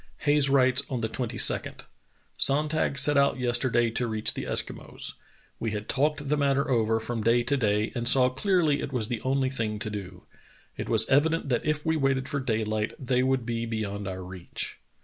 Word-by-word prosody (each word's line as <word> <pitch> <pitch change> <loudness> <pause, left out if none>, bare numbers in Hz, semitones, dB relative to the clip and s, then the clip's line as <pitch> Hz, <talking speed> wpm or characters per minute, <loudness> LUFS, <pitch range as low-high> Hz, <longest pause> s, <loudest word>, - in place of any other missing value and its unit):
Hayes 145 -2 +3
writes 130 -1 +4
on 125 -3 -3
the 110 - 0
22d: 120 +1 0 0.5
"Sonntag 150 0 +2
set 145 0 +5
out 140 0 +3
yesterday 120 -1 +1
to 120 +1 -1
reach 110 -1 0
the - - -5
Eskimos. - - -3 0.5
We 115 - -2
had 105 0 -5
talked 145 +1 0
the 150 +2 +1
matter 140 0 +1
over 115 -2 +2
from 115 0 -4
day 115 +2 +3
to 120 +4 0
day, 105 -4 0
and 120 -2 -2
saw 130 0 +5
clearly 155 +1 +1
it - - -5
was 120 -4 -2
the 120 -3 -3
only 130 0 0
thing 110 -5 -2
to 105 0 -5
do. 100 -3 -7 0.5
It - - -6
was - - +3
evident 150 +2 +2
that 125 +3 -1
if 150 -1 -1
we 160 0 +1
waited 135 -2 0
for 140 - -2
daylight 110 -4 -1
they 125 -1 0
would 130 -2 0
be 115 0 -3
beyond 105 -3 -4
our 95 -1 -5
reach." 90 -1 -6
125 Hz, 190 wpm, -27 LUFS, 110-140 Hz, 0.5 s, set